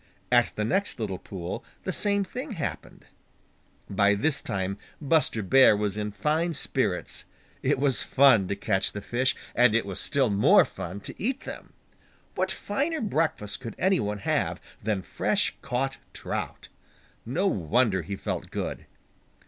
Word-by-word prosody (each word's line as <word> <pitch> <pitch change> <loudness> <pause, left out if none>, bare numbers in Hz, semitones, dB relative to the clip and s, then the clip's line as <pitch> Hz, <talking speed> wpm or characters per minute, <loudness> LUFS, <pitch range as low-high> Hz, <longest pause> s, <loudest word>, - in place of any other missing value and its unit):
At 120 -1 +4
the 105 - -1
next 195 - 0
little 100 -5 -3
pool 90 -3 -6 0.2
the - - -2
same 200 -1 +3
thing 255 +7 -6
happened. 165 -7 -6 0.8
By 100 +1 +3
this 140 +7 +2
time 95 +1 -3 0.2
Buster 150 -7 +2
Bear 120 +1 +6
was 105 -1 -1
in 105 0 -3
fine 155 +9 0
spirits. - - -1 0.4
It - - +1
was 135 -2 +4
fun 130 -8 +5
to 100 - -2
catch 95 -1 0
the 105 - -5
fish, 125 +5 0 0.2
and 120 -2 +4
it 115 - +2
was 100 -1 -3
still 135 -4 +2
more 100 +1 +6
fun 95 +4 -7
to - - -8
eat 260 +6 -1
them. - - -9 0.6
What - - -1
finer 290 +10 -2
breakfast 160 - -1
could 120 -3 -7
any 190 +1 +2
one 105 -2 -2
have 100 - -1 0.2
than 100 -3 -1
fresh - - 0
caught 135 0 -2
trout? - - -5 0.5
No 160 - -1
wonder 100 - +2
he 100 +5 -5
felt - - -4
good! - - -5
120 Hz, 155 wpm, -27 LUFS, 100-155 Hz, 0.8 s, Bear